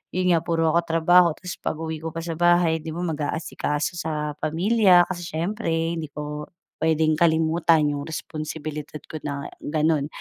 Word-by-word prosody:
yun 180 0 +2
nga 170 - +4
puro 165 -1 +1
ako 170 - +4
trabaho 170 +2 +5
tas 180 -1 -8
pag-uwi 160 0 -4
ko 160 0 -6
pa 165 - -4
sa 165 -1 -5
bahay, 175 -2 +4
di 160 0 -7
ba 175 - -3
mag-aasikaso 155 0 -2
sa 150 -1 -2
pamilya, 180 +3 +4
kasi 175 -2 -6
siyempre 195 +6 -2
hindi 165 0 -1
ko 150 +1 -6 0.3
puwedeng 160 -1 +2
kalimutan 160 -1 +3
yung 145 -1 -3
responsibilidad 155 -1 -6
ko 155 - -5
na 140 -1 -4
ganun. 155 -1 0
160 Hz, 160 wpm, -24 LUFS, 155-170 Hz, 0.3 s, trabaho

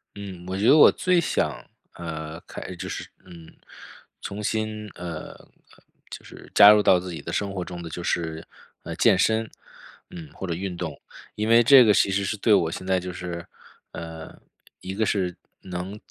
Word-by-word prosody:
嗯， 95 -3 -9
我 95 +1 -3
觉 100 - -1
得 - - +7
我 155 - +8
最 180 -2 +1
想， - - -2 0.3
呃， 80 -2 -6
开 - - -9
就 - - -7
是， - - -6 0.2
嗯， 85 -2 -14 0.7
重 105 +1 -6
新， 110 0 -3
呃， 85 -1 -7 0.8
就 - - -10
是 - - -14
加 100 0 +9
入 105 0 +5
到 90 - +5
自 90 0 -7
己 80 - -7
的 - - -6
生 100 -1 -2
活 95 -2 -3
中 90 -1 -8
的， 85 - -7
就 85 +2 -6
是， 80 -2 -2 0.4
呃， 85 - -6
健 100 +2 +4
身， 110 +2 +1 0.6
嗯， 80 -4 -10
或 - - -7
者 85 - -2
运 90 +2 -4
动。 80 -5 -6 0.4
因 105 +1 -2
为 115 +1 +6
这 130 +1 +8
个 105 - +5
其 100 - +3
实 100 +1 0
是 95 - -2
对 105 +1 +2
我 85 -5 +3
现 95 - -7
在 95 0 +1
就 90 0 -6
是， 85 -1 -6 0.5
呃， 80 -1 -9 0.4
一 95 - -6
个 110 +3 0
是 95 -4 -1 0.3
能 90 +2 -6
95 Hz, 205 characters per minute, -24 LUFS, 85-105 Hz, 0.8 s, 加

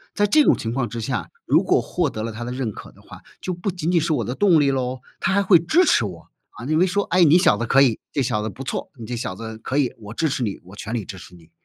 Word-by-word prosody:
在 205 - +3
这 300 +8 +5
种 - - +4
情 115 +1 -4
况 130 -3 -1
之 115 - -6
下， 110 - -3 0.2
如 - - +3
果 - - +3
获 - - -1
得 110 - -5
了 115 - -3
他 120 +2 -6
的 120 - -5
认 125 -3 -3
可 - - -11
的 - - -21
话， - - -13 0.2
就 185 - -3
不 180 +3 -3
仅 175 -2 -3
仅 170 -2 +3
是 160 +1 -1
我 120 -8 0
的 125 +5 -4
动 185 -6 +4
力 140 -1 +3
咯， 130 -1 -2 0.2
他 - - +1
还 200 - +3
会 185 -4 +6
支 320 - +3
持 125 - +3
我， 85 -4 -8 0.2
啊， 115 - -11
认 155 +3 +1
为 185 - +4
说： 200 +3 0
“哎， 180 -1 +6
你 160 +2 +6
小 180 - +4
子 120 - -2
可 135 +4 +4
以， 120 -5 +3
这 140 - -1
小 105 -3 -1
子 110 - -3
不 130 - -9
错， 130 - -4
你 115 -3 -9
这 125 - -4
小 115 -5 -4
子 110 +1 -7
可 130 +4 -3
以， 135 -4 +1
我 105 -1 -9
支 160 +7 0
持 135 -3 -2
你， 100 -3 -3
我 90 +3 -14
全 110 +2 -6
力 110 -5 -2
支 95 - -8
持 90 0 -13
你。” 85 -1 -19
130 Hz, 335 characters per minute, -22 LUFS, 110-170 Hz, 0.2 s, 会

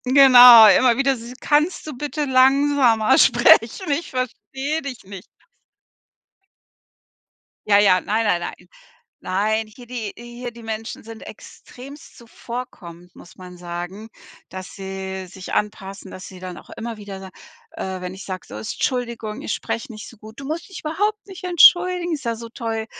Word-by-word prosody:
Genau, 250 -3 +9
immer 235 +4 +4
wieder 275 0 +2
dieses: 240 0 -9
„Kannst 305 +4 0
du 305 -3 -7
bitte 295 +3 -3
langsamer 265 -3 +3
sprechen? 240 - +4
Ich 295 +4 -2
verstehe 265 +4 -4
dich 270 -5 -8
nicht.“ 195 -1 -10 2.4
Ja, 200 -1 +5
ja, 195 -3 +4
nein, 220 +2 -1
nein, 175 -4 +1
nein. - - -8 0.5
Nein. 215 +4 -1
Hier 240 +3 -15
die 230 -4 -6
hier 240 +1 -9
die 235 0 -14
Menschen 220 0 -6
sind 225 0 -11
extremst 275 +5 -13
zuvorkommend, 225 -8 -10
muss 175 - -16
man 180 -1 -12
sagen, 175 +5 -7 0.4
dass 185 0 -9
sie 190 -1 -6
sich 185 +1 -10
anpassen, 195 -2 -4
dass 185 - -10
sie 185 - -12
dann 180 -1 -8
auch - - -15
immer 230 0 -7
wieder 200 -2 -9
sagen 190 -1 -12 0.4
äh, 190 -1 -6
wenn 180 0 -6
ich 190 +1 -10
sage, 185 -1 -7
so: 105 - -9
„Tschuldigung, 235 - -4
ich - - -3
spreche 230 - -5
nicht 215 -1 -10
so 230 - -17
gut. 215 +3 -14
Du 275 - -8
musst 315 +6 -5
dich 385 - -9
überhaupt 415 +7 -2
nicht 380 -2 -10
entschuldigen. 355 0 +4
Ist 285 -4 -6
ja 230 -1 -1
so 230 +1 -10
toll, 225 -1 -4
230 Hz, 160 wpm, -21 LUFS, 195-270 Hz, 2.4 s, Genau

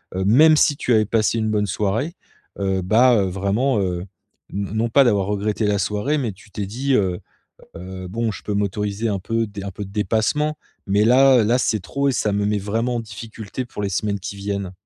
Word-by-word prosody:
heu, 95 - -1
même 155 +10 +6
si 145 -1 +3
tu 125 - 0
avais 110 -1 +4
passé 115 +1 +1
une 110 -1 0
bonne 105 -1 +1
soirée, 105 - -1 0.4
heu, 95 -1 0
bah, 120 +7 +5
heu, 100 -3 +2
vraiment, 100 +7 0
heu, 90 -2 -2 0.5
n 100 -1 -3
non 115 +2 0
pas 140 +4 +5
d'avoir 105 -6 +2
regretté 105 +1 -1
la 100 -1 +1
soirée 105 +10 0
mais 120 -6 -2
tu 100 +2 -19
t'es 100 -1 -4
dit, 130 +6 -1
heu: 95 -5 +1 0.6
«Heu, 95 +1 -7
bon 115 +3 -1
je - - -9
peux 105 - -2
m'autoriser 105 +2 -1
un 100 -2 -1
peu 115 +3 -1
d 100 -1 -8
un 100 - -4
peu 105 - -6
de 95 - -11
dépassement, 110 +9 0 0.3
mais 100 +2 +2
là 130 0 +6
là 120 +4 +2
c'est 110 -4 0
trop 140 +8 -1
et 135 - +2
ça 105 -4 0
me 100 0 0
met 105 0 +1
vraiment 115 +5 -1
en - - -1
difficulté 110 +2 -7
pour 110 -3 -7
les 100 - 0
semaines 100 +1 -1
qui 100 - -6
viennent»? 100 -1 -4
105 Hz, 220 wpm, -21 LUFS, 100-115 Hz, 0.6 s, même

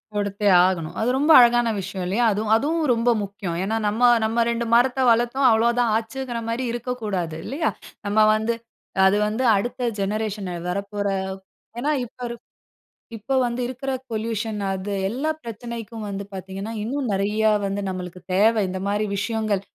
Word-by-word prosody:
கொடுத்தே 205 0 0 0.2
ஆகணும். 170 -4 -2
அது 225 - +1
ரொம்ப 295 +4 +3
அழகான 240 -1 +5
விஷயம் 190 -1 -5
இல்லையா? 220 +6 +1
அதுவும் 210 +1 0
அதுவும் 310 +7 0
ரொம்ப 230 +1 +1
முக்கியம். 195 -4 -5
ஏன்னா 215 +3 -1
நம்ம 215 +3 -1 0.2
நம்ம 230 +2 +2
2 235 0 -1
மரத்த 245 +2 +3
வளர்த்தோம். 240 +4 +2
அவ்வளோ 225 +1 +4
தான் 235 -2 +2
ஆச்சுங்குற 240 +1 -4
மாரி 230 +3 -2
இருக்கக்கூடாது. 215 -9 -3
இல்லையா? 310 +4 -1 0.4
நம்ம 205 +2 +2 0.2
வந்து 220 +2 0 0.5
அது 190 +2 +4
வந்து 220 +5 -2
அடுத்த 245 +5 -3 0.2
ஜெனரேஷன் 205 -1 -2 0.2
வரப்போற 200 +2 -3 0.7
ஏன்னா 290 +5 0
இப்ப 240 - -18
இருக் 235 0 -9 0.7
இப்போ 265 +6 -2
வந்து 240 +1 -2
இருக்குற 260 +2 -4 0.2
பொல்யூஷன் 220 -1 -2
அது. 190 +2 -4 0.2
எல்லா 260 +9 -2
பிரச்சனைக்கும் 230 -1 -7
வந்து 200 0 -4
பார்த்தீங்கன்னா, 190 +3 -6
இன்னும் 255 +3 -2
நெறைய 210 +3 +1 0.2
வந்து 200 +1 -2
நம்மளுக்கு 180 -1 -5
தேவை, 215 +3 +4
இந்த 185 0 -4
மாரி 205 +1 0
விஷயங்கள். 210 -1 -1
220 Hz, 150 wpm, -23 LUFS, 200-240 Hz, 0.7 s, அழகான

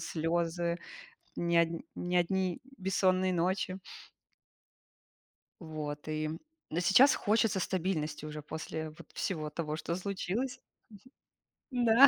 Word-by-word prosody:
слёзы, 170 +1 0 0.6
не 170 0 +1
одн 165 0 +3 0.2
не 180 0 -1
одни 180 0 +2 0.2
бессонные 185 -1 +3
ночи. 185 +2 +1 1.8
Вот, 155 -3 -5
и, 155 0 -1 0.4
э, 165 - 0
сейчас 245 +10 +7
хочется 210 -2 +2
стабильности 160 -5 -1
уже 150 0 -5
после 160 +1 -4
вот 155 - -13
всего 155 -6 -2
того, 155 0 -2
что 170 +1 -2
случилось. 200 +7 -2 1.1
Мгм. 245 -1 +1
Да. 235 +5 +9
175 Hz, 110 wpm, -32 LUFS, 160-190 Hz, 1.8 s, Да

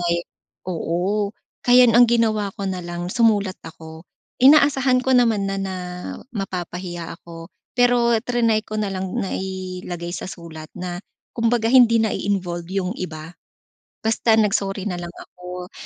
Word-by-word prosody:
may 170 0 0 0.4
oo. 185 +4 -1 0.3
Kaya 250 0 +6
ang 240 +1 +6
ginawa 220 -3 +2
ko 200 - -4
nalang 175 -1 -4
sumulat 205 -5 +2
ako. 160 +1 -12 0.3
Inaasahan 270 -2 +5
ko 265 - +2
naman 230 -5 +3
na 195 0 -2
na 190 -1 -3 0.6
mapapahiya 180 -4 -5
ako. 165 -1 -11 0.2
Pero 245 -1 +4
triny 230 -3 +1
ko 215 0 -4
na 210 - -1
lang 190 -1 -3 0.2
na 195 - -2
ilagay 185 -2 -5
sa - - -6
sulat 165 -4 -9
na 180 -1 -5 0.4
kumbaga 230 -1 +1
hindi 235 -3 +6
na-involve 185 -5 -2
yung 190 -1 -1
iba. 160 -1 -7 0.7
Basta 225 0 +3
nag-sorry 200 -2 +1
nalang 175 -3 -4
ako, 180 0 -9
195 Hz, 130 wpm, -22 LUFS, 175-230 Hz, 0.7 s, Kaya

